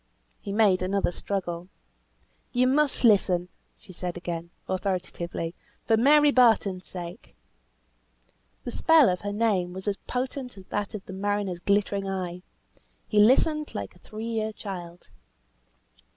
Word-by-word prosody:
He 200 - -6
made 200 -3 +3
another 190 0 0
struggle. 175 -2 -4 0.8
"You 250 0 +3
must 280 +2 +2
listen," 185 -5 +4 0.3
she 185 - -15
said 180 0 -5
again, 170 -1 -5 0.2
authoritatively, 180 -3 -3 0.3
"for 225 - +4
Mary 290 +5 +5
Barton's 215 -7 +3
sake." 175 -1 -9 1.3
The 245 - -5
spell 320 - +5
of 180 0 -1
her 205 - -3
name 205 -5 0
was 190 +2 -7
as 200 -1 0
potent 255 -2 -4
as 190 - -12
that 205 +1 -3
of 200 - -7
the 190 - -8
mariner's 200 -2 -2
glittering 200 0 0
eye. 180 -2 -4 0.7
"He 210 - +2
listened 300 +7 +4
like - - -5
a - - -20
three 215 +1 -8
year 220 -1 -1
child." 180 -5 -8
200 Hz, 135 wpm, -26 LUFS, 180-225 Hz, 1.3 s, Mary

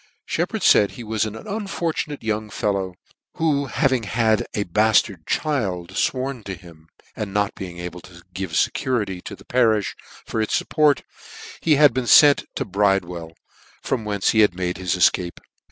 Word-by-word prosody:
Sheppard - - -2
faid 100 - +5
he 120 - -8
was 110 -1 -1
an 110 0 -5
unfortunate 170 - -4
young 110 -1 -2
fellow, 100 -3 -2 0.4
who 145 -3 +1
having 130 -1 +1
had 110 0 +1
a 105 - 0
bartard 100 -2 +2
child 100 - -1
fworn 130 -2 -1
to 95 - -5
him, 85 -3 -16 0.3
and 105 -2 -4
not 100 -1 +1
being 90 -2 -8
able 90 0 -7
to 85 -1 -15
give 95 -2 -4
fecurity 105 -3 0
to - - -7
the - - -18
parifh 110 -5 +2 0.3
for 110 - -2
its 110 - +1
fupport, 150 -3 +2 0.6
he 155 -2 +3
had 145 -3 +6
been 130 0 -1
fent 145 +2 +7
to 135 - -2
Bridewell, 95 -5 0 0.5
from 125 -4 -1
whence 105 -1 0
he 110 - +2
had 105 -5 +4
made 90 0 -2
his 90 -1 -1
efcape. 90 -1 +2
105 Hz, 165 wpm, -22 LUFS, 95-130 Hz, 0.6 s, fent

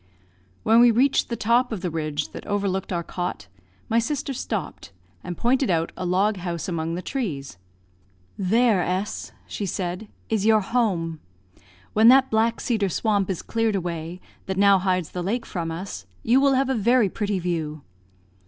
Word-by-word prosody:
When 225 +1 +5
we 240 0 +7
reached 255 +4 +2
the 235 - -1
top 235 +3 +2
of 210 -5 -4
the 180 -2 -2
ridge 155 -2 -2
that - - -8
overlooked 195 -2 -1
our 170 -1 -1
cot, 175 - -4 0.4
my 230 - +2
sister 280 +3 -2
stopped, - - -5 0.3
and 175 - -6
pointed 260 +1 +2
out 165 -2 +1
a 185 - -4
log 195 +4 +2
house 175 0 -4
among 165 -2 -2
the 180 - -5
trees. 145 - -4 0.8
"There, 215 +1 +3
S 185 +4 -3
," - - -32
she 200 - -4
said, 180 +3 -3 0.2
"is 220 -3 0
your 215 0 +5
home. 190 -8 0 0.7
When 220 +2 +5
that 265 +2 +6
black 225 +1 +2
cedar 215 -5 0
swamp 200 +1 0
is 185 - -3
cleared 225 -2 0
away, 170 -1 -4 0.3
that 190 0 -2
now 200 -1 +5
hides 185 -3 0
the 180 - -4
lake 230 +6 -2
from 170 -3 -4
us, 175 +4 -6 0.2
you 250 +4 +4
will 275 -1 +4
have 265 0 +2
a - - +2
very 235 0 +3
pretty 205 +1 -2
view." 160 -4 -3
200 Hz, 175 wpm, -24 LUFS, 175-230 Hz, 0.8 s, we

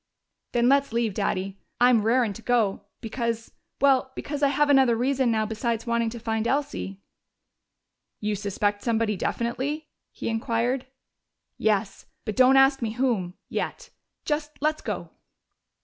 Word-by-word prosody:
"Then 240 0 +3
let's 275 0 +3
leave, 230 -2 0
Daddy. 195 -1 -2 0.2
I'm 245 -2 +5
'rarin' 230 0 +2
to 230 - -10
go' 215 -4 +1 0.2
because 230 0 -3 0.3
well 265 -1 +3
because 290 0 -4
I 285 - +5
have 290 +2 +2
another 265 -4 +5
reason 260 +1 +1
now 220 -1 +1
besides 225 +1 -2
wanting 235 -1 +1
to 235 +1 -7
find 225 0 -1
Elsie!" 275 -9 -2 1.2
"You 210 0 -1
suspect 205 0 -1
somebody 225 -2 +1
definitely?" 265 - -2 0.2
he - - -6
inquired. 235 +3 -1 0.7
"Yes. 205 -2 0 0.2
But 215 - -3
don't 260 +1 +6
ask 270 0 +5
me 220 -2 -2
whom 225 -8 0
yet. - - -4 0.3
Just 300 0 -2
let's 305 +1 0
go." - - -5
235 Hz, 140 wpm, -26 LUFS, 220-265 Hz, 1.2 s, don't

